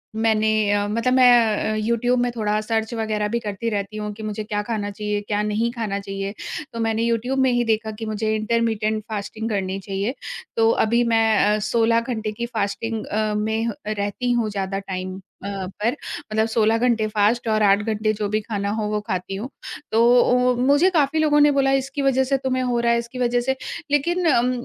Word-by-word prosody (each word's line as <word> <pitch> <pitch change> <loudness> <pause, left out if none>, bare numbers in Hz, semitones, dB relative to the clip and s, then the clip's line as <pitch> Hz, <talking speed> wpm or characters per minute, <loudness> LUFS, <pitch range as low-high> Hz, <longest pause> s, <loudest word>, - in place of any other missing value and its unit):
मैंने 220 -1 +2 0.2
अ, 205 0 +1
मतलब 230 +4 0
मैं 240 -4 +5
अ, - - -1
यूट्यूब 235 +3 +1
में 245 0 +1
थोड़ा 210 -2 0
सर्च 220 +1 -2
वग़ैरह 215 -2 -1
भी - - +1
करती 215 0 -3
रहती 205 0 -3
हूँ 210 0 -4
कि 220 +1 -10
मुझे 215 0 -4
क्या 210 -1 -2
ख़ाना 210 -2 -3
चाहिए, 210 0 -3
क्या 205 0 -1
नहीं 215 +3 0
ख़ाना 220 -5 -3
चाहिए। 195 0 -5 0.4
तो 230 - -5
मैंने 225 0 0
यूट्यूब 235 +3 0
में 260 -1 +3
ही 240 0 +2
देखा 220 -1 0
कि 225 - -4
मुझे 215 0 -1
इंटरमिटेंट 220 -1 0
फास्टिंग 215 +1 -4
करनी 195 -2 -2
चाहिए। 195 +4 -3 0.4
तो 225 0 +4 0.2
अभी 235 +2 +2
मैं 225 0 +4 0.3
अ, - - -1
16 230 0 +3
घंटे 225 -3 -3
की 235 +3 -4
फास्टिंग 225 -1 -3
अ, 215 0 -1
में 220 +2 -1
अ, - - -2
रहती 215 +4 -2
हूँ 235 -3 +1
ज़्यादा 195 -1 -3
टाइम 185 -1 -5 0.2
अ, - - -4 0.3
पर 235 +5 +1 0.4
मतलब 220 +1 +2
16 225 0 +2
घंटे 230 -2 +2
फास्ट 215 +3 +1
और 215 0 +2
8 200 0 +5
घंटे 215 0 0
जो 210 -1 -2
भी 215 +1 +1
ख़ाना 205 -2 -3
हो - - -1
वो 210 0 0
ख़ाती 185 +1 -3
हूँ। 225 +7 -5 0.4
तो 225 - +3 0.2
ओ 250 +1 +3
मुझे 285 +8 +4
काफ़ी 315 -3 +1
लोगों 300 -1 +3
ने 295 0 +6
बोला 275 -1 +2
इसकी 275 +2 -4
वजह 265 -1 +3
से 270 +1 +1
तुम्हें 255 -1 -1
हो 245 -1 0
रहा 235 0 +2
है - - +2
इसकी 235 +2 -7
वजह 245 0 +2
से। 265 +2 0 0.4
लेक़िन 345 +5 +1
अम 250 -3 +3
220 Hz, 205 wpm, -22 LUFS, 210-240 Hz, 0.4 s, ने